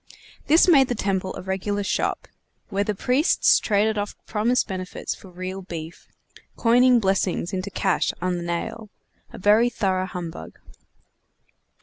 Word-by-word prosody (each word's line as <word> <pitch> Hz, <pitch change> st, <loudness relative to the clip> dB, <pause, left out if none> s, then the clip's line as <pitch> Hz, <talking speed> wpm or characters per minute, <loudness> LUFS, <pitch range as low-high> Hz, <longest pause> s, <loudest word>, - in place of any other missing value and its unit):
This 320 Hz, +5 st, +5 dB
made 275 Hz, -7 st, +6 dB
the 245 Hz, -, -2 dB
temple 190 Hz, -2 st, -2 dB
a -, -, -7 dB
regular 195 Hz, +2 st, -2 dB
shop, -, -, -1 dB, 0.4 s
where 200 Hz, -1 st, 0 dB
the 210 Hz, 0 st, -2 dB
priests 255 Hz, -, +3 dB
traded 215 Hz, 0 st, +1 dB
off 205 Hz, 0 st, -4 dB
promised 230 Hz, +4 st, +1 dB
benefits 185 Hz, -1 st, -5 dB
for 190 Hz, -, -14 dB
real 185 Hz, +2 st, -6 dB
beef; 170 Hz, -3 st, -8 dB, 0.5 s
coining 245 Hz, +1 st, +5 dB
blessings 195 Hz, -2 st, 0 dB
into 185 Hz, +1 st, -3 dB
cash 190 Hz, -1 st, 0 dB
on 180 Hz, 0 st, -1 dB
the 175 Hz, -, -5 dB
nail; 175 Hz, +6 st, -4 dB, 0.4 s
a -, -, -10 dB
very 210 Hz, +5 st, +4 dB
thorough 190 Hz, -5 st, -1 dB
humbug. 175 Hz, -3 st, -7 dB
195 Hz, 140 wpm, -23 LUFS, 185-220 Hz, 0.5 s, made